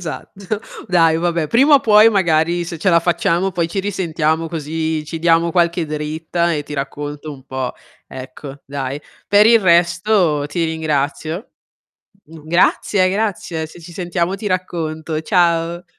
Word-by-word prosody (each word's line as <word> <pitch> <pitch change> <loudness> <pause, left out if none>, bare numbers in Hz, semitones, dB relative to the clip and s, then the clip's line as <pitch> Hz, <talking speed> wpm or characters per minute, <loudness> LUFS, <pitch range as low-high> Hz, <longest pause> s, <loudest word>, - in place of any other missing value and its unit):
Esatto. 195 +4 -6 0.3
Dai 165 -3 +4
vabbè, 170 -2 0
prima 275 - +5
o 280 - +6
puoi 215 -1 +6
magari, 170 -3 +1
se 170 -1 -7
ce 190 - 0
la 170 -1 +4
facciamo, 175 +2 0
poi 170 -1 -1
ci 195 - -4
risentiamo 165 -5 -1
così 160 0 -3
ci 160 +2 -6
diamo 165 +1 +3
qualche 170 -1 +1
dritta 160 +3 -2
e 150 - -2
ti 150 - -8
racconto 145 +2 -5
un 135 -2 -13
po' 130 -1 -4 0.3
ecco, 135 +2 -10
dai. 140 0 -4 0.3
Per 205 +1 +6
il 230 0 +6
resto 175 -2 +2
ti 165 +3 -2
ringrazio. 160 - -2 0.8
G 160 +1 -13
grazie 185 +3 +2
grazie. 190 -6 -2
Se 160 - -14
ci 170 +1 -12
sentiamo 175 0 -2
ti 210 - -7
racconto. 160 -4 -3
Ciao! 170 0 +1
165 Hz, 150 wpm, -18 LUFS, 155-180 Hz, 0.8 s, o